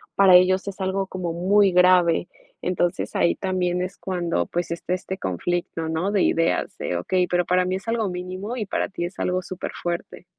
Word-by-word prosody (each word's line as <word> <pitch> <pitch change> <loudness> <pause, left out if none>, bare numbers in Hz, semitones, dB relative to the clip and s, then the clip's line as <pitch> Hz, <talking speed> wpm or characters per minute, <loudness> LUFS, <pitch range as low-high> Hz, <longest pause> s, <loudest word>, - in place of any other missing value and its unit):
para 190 -2 +7
ellos 185 +2 +4
es 195 0 -6
algo 190 +1 -1
como 180 -3 -4
muy 195 +3 +3
grave. 180 -1 +4 0.3
Entonces, 175 -1 -1
ahí 170 - +3
también 180 -2 -1
es 185 +2 -4
cuando, 175 - -2
pues, 175 -1 -3
está 170 +1 -3
este 190 +1 -4
conflicto 165 - -2
¿no?, 165 +5 -1
de 200 - +2
ideas, 165 0 +1
de: 90 - -2
"Okey, 180 - 0
pero 175 0 +1
para 180 0 +2
mí 185 +1 -1
es 190 +4 -7
algo 225 -3 0
mínimo, 185 +6 -5
y 215 - -2
para - - -2
ti 175 -3 -4
es 180 - -8
algo 180 0 0
superfuerte". 175 -1 -5
180 Hz, 190 wpm, -23 LUFS, 175-190 Hz, 0.3 s, para